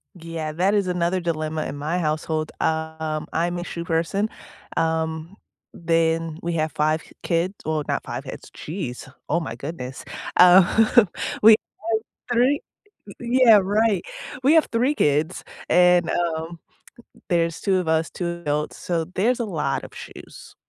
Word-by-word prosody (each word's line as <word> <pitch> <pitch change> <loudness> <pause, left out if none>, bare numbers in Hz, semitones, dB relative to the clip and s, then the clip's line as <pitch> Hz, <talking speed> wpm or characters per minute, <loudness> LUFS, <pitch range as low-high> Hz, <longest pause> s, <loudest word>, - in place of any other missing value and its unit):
Yeah, 165 -2 -5
that 185 +5 +2
is 200 -3 +2
another 180 0 0
dilemma 155 -2 -2
in 140 - -5
my 155 +5 -2
household. 155 -1 -1
Um, 160 -1 -2
I'm 175 +2 0
a 175 - -4
shoe 170 -1 -6
person. 170 +5 0 0.5
Um, 160 +2 -1 0.4
then 165 -1 0
we 170 0 -2
have 155 -1 0
5 155 +1 0 0.2
kids, 170 +3 0
well, 155 -1 -1
not - - -1
5 - - -5
kids, - - -9
jeez, 150 -8 -6 0.2
oh, 170 - +2
my 115 -9 -5
goodness. 130 -1 -7 0.3
Uh, 190 +6 +6 0.4
we 220 - +10
have 215 - +1 0.6
3, 265 +5 +3 0.6
yeah, 240 -2 +6
right. 205 0 +2 0.4
We 280 +4 +5
have 320 -1 +5
3 250 +6 +1
kids 150 - +1 0.3
and, 180 -1 +5
um, 165 -1 -2 0.7
there's 170 -2 +1
two 195 -2 +2
of 180 - -4
us, 160 0 +1
2 170 -1 -4
adults, 150 -1 -2
so 170 -2 -1
there's 235 +6 +2
a 235 - -1
lot 165 -8 -2
of - - -10
shoes, - - -11
170 Hz, 150 wpm, -23 LUFS, 160-185 Hz, 0.7 s, we